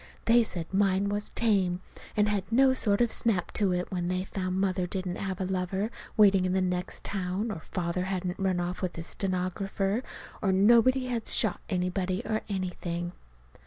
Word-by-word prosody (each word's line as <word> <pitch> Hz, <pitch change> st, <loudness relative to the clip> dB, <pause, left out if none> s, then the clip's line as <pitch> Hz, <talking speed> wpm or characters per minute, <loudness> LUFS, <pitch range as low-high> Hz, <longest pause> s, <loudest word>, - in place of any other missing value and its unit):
They 235 Hz, +1 st, +6 dB
said 175 Hz, -7 st, -3 dB
mine 195 Hz, 0 st, +2 dB
was 205 Hz, 0 st, -1 dB
tame, 195 Hz, -6 st, +1 dB, 0.4 s
and 210 Hz, 0 st, +4 dB
had 205 Hz, -1 st, -1 dB
no 260 Hz, +3 st, +5 dB
sort 210 Hz, -4 st, +2 dB
of 240 Hz, -2 st, +3 dB
snap 205 Hz, -7 st, +1 dB
to 200 Hz, -3 st, +1 dB
it, 180 Hz, 0 st, -2 dB
when 175 Hz, -2 st, -2 dB
they 185 Hz, +1 st, -1 dB
found 185 Hz, -1 st, -3 dB
Mother 185 Hz, -2 st, 0 dB
didn't 185 Hz, -1 st, -3 dB
have 190 Hz, -2 st, -4 dB
a 190 Hz, -, -1 dB
lover 190 Hz, +3 st, -1 dB, 0.3 s
waiting 200 Hz, -3 st, +6 dB
in 185 Hz, 0 st, 0 dB
the 190 Hz, -, +2 dB
next 180 Hz, -1 st, -2 dB
town, 195 Hz, +3 st, -2 dB
or 160 Hz, -, -6 dB
Father 180 Hz, 0 st, -2 dB
hadn't 185 Hz, -1 st, -3 dB
run 190 Hz, -2 st, +1 dB
off 175 Hz, +1 st, -3 dB
with 180 Hz, -2 st, -2 dB
his 165 Hz, -, -5 dB
stenographer, 195 Hz, +3 st, -1 dB, 0.4 s
or 195 Hz, -, +2 dB
nobody 235 Hz, +7 st, +5 dB
had 240 Hz, -3 st, -3 dB
shot 215 Hz, -6 st, +3 dB
anybody, 180 Hz, 0 st, -1 dB
or 220 Hz, -1 st, -1 dB
anything. 175 Hz, -2 st, -3 dB
190 Hz, 180 wpm, -28 LUFS, 180-205 Hz, 0.4 s, They